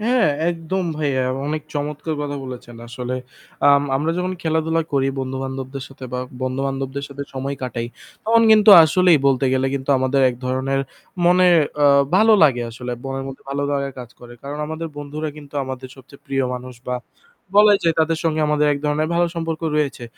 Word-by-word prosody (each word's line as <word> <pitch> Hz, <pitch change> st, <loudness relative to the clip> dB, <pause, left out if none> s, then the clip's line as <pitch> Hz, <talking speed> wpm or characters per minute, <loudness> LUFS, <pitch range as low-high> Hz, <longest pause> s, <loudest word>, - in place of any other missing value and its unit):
হ্যাঁ, 240 Hz, -2 st, +2 dB, 0.2 s
একদম 175 Hz, +2 st, -3 dB
ভাইয়া। 140 Hz, -4 st, 0 dB, 0.2 s
অনেক 155 Hz, +1 st, -2 dB
চমৎকার 150 Hz, +2 st, -3 dB
কথা 145 Hz, -1 st, -4 dB
বলেছেন। 125 Hz, -2 st, -9 dB
আসলে 125 Hz, +1 st, -4 dB, 0.5 s
আম 140 Hz, 0 st, +5 dB
আমরা 155 Hz, +4 st, 0 dB
যখন 180 Hz, +1 st, -1 dB
খেলাধুলা 160 Hz, 0 st, 0 dB
করি 135 Hz, -1 st, +2 dB
বন্ধু-বান্ধবদের 130 Hz, 0 st, -5 dB
সাথে 135 Hz, -1 st, -11 dB
বা 125 Hz, -, -2 dB, 0.2 s
বন্ধু-বান্ধবদের 135 Hz, +1 st, -3 dB
সাথে 140 Hz, 0 st, -7 dB
সময় 135 Hz, +1 st, -3 dB
কাটাই, 120 Hz, -2 st, -3 dB, 0.4 s
তখন 230 Hz, +1 st, +4 dB
কিন্তু 215 Hz, 0 st, +7 dB
আসলেই 175 Hz, +1 st, +4 dB
বলতে 135 Hz, 0 st, +2 dB
গেলে 130 Hz, 0 st, +1 dB
কিন্তু 135 Hz, 0 st, -3 dB
আমাদের 130 Hz, +1 st, +1 dB
এক -, -, -7 dB
ধরনের 130 Hz, +1 st, 0 dB, 0.5 s
মনে 180 Hz, +1 st, +5 dB, 0.7 s
ভালো 220 Hz, +3 st, +5 dB
আ -, -, +2 dB
লাগে 125 Hz, -5 st, +2 dB
আসলে। 125 Hz, +2 st, -6 dB
বনের 135 Hz, 0 st, -4 dB
মধ্যে 135 Hz, -, -10 dB
ভালো 140 Hz, +1 st, -2 dB, 0.4 s
কাজ 125 Hz, -2 st, -9 dB
করে। 120 Hz, 0 st, -12 dB
কারণ 145 Hz, +2 st, -6 dB
আমাদের 160 Hz, +1 st, -5 dB
বন্ধুরা 145 Hz, +2 st, -5 dB
কিন্তু 145 Hz, -1 st, -13 dB
আমাদের 130 Hz, 0 st, -7 dB
সবচেয়ে 135 Hz, +1 st, -16 dB
প্রিয় 135 Hz, -1 st, 0 dB
মানুষ 125 Hz, 0 st, -8 dB
বা 125 Hz, -, 0 dB, 0.6 s
বলাই 210 Hz, -1 st, +7 dB
যায় 165 Hz, -1 st, +3 dB
তাদের 160 Hz, 0 st, +1 dB
সঙ্গে 155 Hz, -1 st, +1 dB
আমাদের 150 Hz, 0 st, +2 dB
এক 140 Hz, -, -2 dB
ধরনের 150 Hz, +1 st, 0 dB
ভালো 175 Hz, 0 st, +3 dB
সম্পর্ক 165 Hz, -1 st, -3 dB, 0.2 s
রয়েছে। 140 Hz, -4 st, -1 dB
140 Hz, 175 wpm, -21 LUFS, 130-160 Hz, 0.7 s, কিন্তু